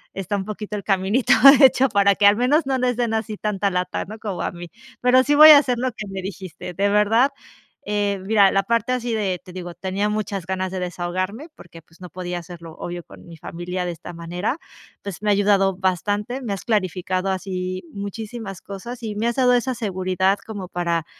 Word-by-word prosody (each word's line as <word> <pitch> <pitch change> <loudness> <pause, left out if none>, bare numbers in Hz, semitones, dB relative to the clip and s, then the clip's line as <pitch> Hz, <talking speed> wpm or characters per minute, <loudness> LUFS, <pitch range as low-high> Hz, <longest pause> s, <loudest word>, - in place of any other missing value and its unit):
está 195 +1 -3
un 190 - -4
poquito 210 0 -6
el 200 - -6
caminito 195 +6 +2 0.3
hecho, 265 0 +6
para 200 -1 +3
que 205 - +2
al 205 +1 +6
menos 270 +6 +2
no 265 -1 0
les 250 -1 0
den 240 -2 0
así 220 -1 -3
tanta 205 -1 -1
lata, 180 -1 -2
¿no?, 215 +2 -9
como 205 -5 -4
a - - -2
mí. 175 -1 -10 0.3
Pero 250 +1 +5
sí 290 +2 +2
voy 305 +1 +10
a 300 - +10
hacer 255 -4 -1
lo 255 +2 -1
que 215 -3 -8
me 195 -1 -5
dijiste 185 -1 -7
de 200 +3 +1
verdad. 215 +6 +3 0.6
Eh, 205 -1 0
mira, 200 -2 +4
la 195 - +2
parte 230 +3 0
así 245 -2 -2
de, 195 -5 -1
te 180 - -13
digo, 175 -1 -7
tenía 195 +3 -2
muchas 205 -3 -3
ganas 185 0 -3
de 190 - -3
desahogarme 185 - -4
porque, 170 -1 -14
pues 165 +2 -25
no 180 - -9
podía 180 +1 -5
hacerlo 170 -1 -11
obvio 175 0 -6
con - - -15
mi 170 -1 -11
familia 180 +3 -5
de 175 - -2
esta 165 +2 -10
manera, 175 - -3 0.5
pues 200 -2 -7
me 210 - 0
ha - - +5
ayudado 200 -1 +3
bastante. 205 +7 -1
Me 235 -5 -4
has 195 - -7
clarificado 185 -3 -1
así 185 -1 -4
muchísimas 205 0 -6
cosas 235 +5 -8
y 215 -2 -4
me 215 +2 -2
has 235 - -1
dado 250 -2 +4
esa 245 +1 +1
seguridad 190 -2 0
como 205 -4 -7
para, 170 -2 -1
200 Hz, 210 wpm, -22 LUFS, 185-225 Hz, 0.6 s, voy